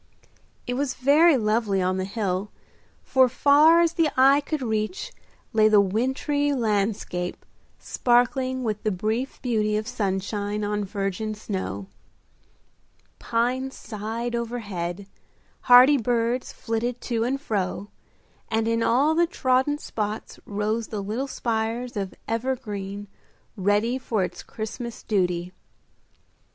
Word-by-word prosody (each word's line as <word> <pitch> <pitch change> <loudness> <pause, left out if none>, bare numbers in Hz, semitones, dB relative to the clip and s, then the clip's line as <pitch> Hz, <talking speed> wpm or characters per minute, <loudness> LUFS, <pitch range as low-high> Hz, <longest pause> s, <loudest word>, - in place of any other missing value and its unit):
It 245 - -2
was 270 +1 -1
very 290 +4 +5
lovely 215 -3 +1
on 185 0 0
the 185 - -1
hill, 195 -1 -2 0.5
for 260 -1 +4
far 295 +6 +5
as 335 -1 +2
the 330 -3 +2
eye 275 +2 +6
could 295 -1 -3
reach 220 - -2 0.4
lay 215 -1 +5
the 215 -1 +6
wintry 265 +8 +1
landscape 205 -6 -1 0.3
sparkling 255 +1 +1
with 215 -3 -2
the 215 - 0
brief 220 +7 -2
beauty 215 -4 +1
of 215 +1 -3
sunshine 205 0 -2
on 210 0 -1
virgin 200 +2 -3
snow. 145 - -4 1.3
Pines 255 +3 -1
sighed 225 +2 -5
overhead, 205 -6 -4 0.6
hardy 255 +4 +9
birds 240 +1 0
flitted 235 +2 -3
to 230 -2 -1
and 265 +3 -1
fro, 205 -5 -3 0.6
and 225 0 0
in 230 0 +1
all 270 +7 +3
the 340 +1 +3
trodden 260 0 +1
spots 215 -6 -5
rose 215 +2 -1
the 205 -2 -4
little 225 +7 -3
spires 230 0 -2
of 195 -2 -4
evergreen 210 -5 -3 0.5
ready 210 +6 +1
for 220 -6 -1
its 180 0 -5
Christmas 230 +1 -7
duty. 180 -4 0
225 Hz, 120 wpm, -25 LUFS, 205-255 Hz, 1.3 s, hardy